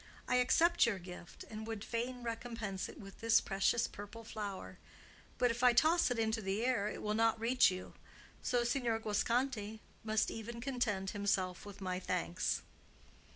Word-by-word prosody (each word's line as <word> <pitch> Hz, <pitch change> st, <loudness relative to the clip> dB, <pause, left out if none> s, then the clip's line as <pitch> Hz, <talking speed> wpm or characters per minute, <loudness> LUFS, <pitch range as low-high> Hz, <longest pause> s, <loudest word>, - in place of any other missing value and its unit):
"I 250 Hz, -, +3 dB
accept 325 Hz, +5 st, +4 dB
your 215 Hz, -4 st, 0 dB
gift, 180 Hz, -1 st, -10 dB
and 220 Hz, 0 st, -7 dB
would 220 Hz, -2 st, -4 dB
fain 245 Hz, +2 st, -3 dB
recompense 230 Hz, -4 st, -4 dB
it -, -, -11 dB
with 195 Hz, -1 st, -11 dB
this 225 Hz, 0 st, +5 dB
precious 200 Hz, +4 st, +1 dB
purple 205 Hz, +3 st, -9 dB
flower; 200 Hz, -, -6 dB, 0.6 s
but 245 Hz, -1 st, +3 dB
if 230 Hz, -, -4 dB
I 250 Hz, -1 st, +7 dB
toss 315 Hz, +7 st, +4 dB
it 245 Hz, -, -1 dB
into 220 Hz, 0 st, +1 dB
the 200 Hz, +4 st, -1 dB
air 240 Hz, -5 st, +2 dB
it -, -, -5 dB
will 210 Hz, -, 0 dB
not 225 Hz, 0 st, +3 dB
reach 245 Hz, +3 st, +5 dB
you. 185 Hz, 0 st, -6 dB, 0.5 s
So 245 Hz, -1 st, +1 dB
Signor 240 Hz, -2 st, +1 dB
Guasconti 220 Hz, 0 st, 0 dB, 0.2 s
must 215 Hz, 0 st, +1 dB
even 230 Hz, +1 st, -6 dB
content 230 Hz, -7 st, -1 dB
himself 195 Hz, -2 st, -1 dB
with 200 Hz, 0 st, -10 dB
my 185 Hz, -1 st, -2 dB
thanks." 180 Hz, -1 st, -1 dB
225 Hz, 165 wpm, -35 LUFS, 200-240 Hz, 0.6 s, I